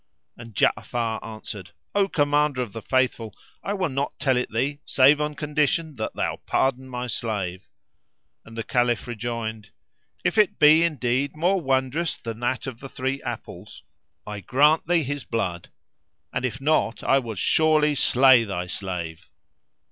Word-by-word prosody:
And 115 -2 -12
Ja'afar 115 +2 0
answered, 110 -3 -8 0.2
"O 200 -1 +3
Commander 145 -5 +1
of 105 - -9
the 115 - -6
Faithful, 120 -5 0 0.3
I 200 - -2
will 190 -3 0
not 140 +1 -3
tell 130 -3 +2
it 125 - -1
thee, 135 +6 -1
save 140 +3 +4
on 150 0 -2
condition 150 +1 0
that 110 - -4
thou - - -1
pardon 130 0 0
my 125 0 -4
slave;" 100 -6 -3 0.8
and 115 0 -13
the 115 - -2
Caliph 120 -1 +1
rejoined, 115 -2 -5 0.5
"If 220 - +1
it 210 - +3
be 155 +2 +7
indeed 140 -4 0
more 180 +4 +1
wondrous 135 +4 0
than 115 -2 -7
that 120 +1 -1
of 130 -4 -6
the 135 - -9
three 130 +2 -3
apples, 110 -5 -8 0.4
I 105 -1 -6
grant 145 - +3
thee 170 -2 +3
his 145 0 -4
blood, 90 -7 -3 0.6
and 130 - -1
if 130 0 -3
not 140 -5 +1
I 135 - +4
will 115 -4 -6
surely 155 +7 +3
slay 130 -3 +5
thy 95 -4 -3
slave." 90 -2 -5
130 Hz, 155 wpm, -24 LUFS, 115-145 Hz, 0.8 s, be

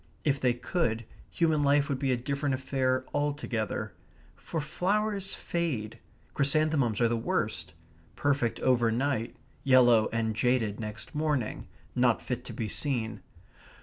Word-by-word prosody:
If 140 -2 +1
they 125 -2 +3
could, 120 -3 -1 0.2
human 160 -3 +2
life 140 0 +3
would 135 -2 -2
be 135 -2 +1
a 125 - +2
different 140 +2 -1
affair 130 -1 0
altogether. 145 -7 -2 0.4
For 165 - -4
flowers 195 +5 0
fade; 150 -12 -3 0.3
chrysanthemums 140 -5 +2
are 120 - +5
the 120 - 0
worst; 115 - -2 0.4
perfect 140 -5 0
over 120 -3 +3
night; 125 -1 -1 0.3
yellow 120 -4 +5
and 110 -1 -1
jaded 115 -4 +1
next 110 0 -6
morning 150 -6 -1 0.3
not 125 -2 +3
fit 125 -1 -4
to - - -6
be 110 - -3
seen. 115 -4 -2
130 Hz, 135 wpm, -29 LUFS, 115-145 Hz, 0.4 s, are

